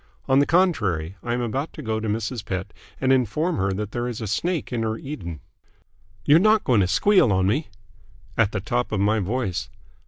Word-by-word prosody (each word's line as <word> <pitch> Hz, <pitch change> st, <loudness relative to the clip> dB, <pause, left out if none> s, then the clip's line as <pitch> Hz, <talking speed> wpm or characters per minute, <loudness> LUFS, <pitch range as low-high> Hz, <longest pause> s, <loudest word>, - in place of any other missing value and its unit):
On 130 Hz, +1 st, +4 dB
the 145 Hz, -, +3 dB
contrary, 100 Hz, -, +1 dB
I 120 Hz, 0 st, -2 dB
am 125 Hz, -, -2 dB
about 130 Hz, +6 st, -3 dB
to 155 Hz, -, -8 dB
go 110 Hz, -2 st, -1 dB
to 110 Hz, -, -4 dB
Mrs. 110 Hz, +1 st, -2 dB
Pett 95 Hz, 0 st, -4 dB, 0.3 s
and 130 Hz, 0 st, +3 dB
inform 140 Hz, -, +1 dB
her 95 Hz, +1 st, 0 dB
that 105 Hz, +1 st, -4 dB
there 120 Hz, 0 st, -2 dB
is 120 Hz, -3 st, -4 dB
a 110 Hz, -, -4 dB
snake 160 Hz, -, -2 dB
in 120 Hz, -, -1 dB
her 110 Hz, 0 st, -1 dB
Eden." 85 Hz, -, -7 dB, 0.8 s
"You're 150 Hz, +3 st, +6 dB
not 215 Hz, +2 st, +4 dB
going 120 Hz, -4 st, +3 dB
to 90 Hz, -, +2 dB
squeal 155 Hz, -, +4 dB
on 95 Hz, -1 st, +2 dB
me?" 130 Hz, +11 st, 0 dB, 0.7 s
"At 110 Hz, -3 st, +2 dB
the 100 Hz, -, -3 dB
top 120 Hz, +4 st, -1 dB
of 105 Hz, -, 0 dB
my 105 Hz, +2 st, +2 dB
voice." 95 Hz, -, -2 dB
115 Hz, 210 wpm, -24 LUFS, 100-135 Hz, 0.8 s, You're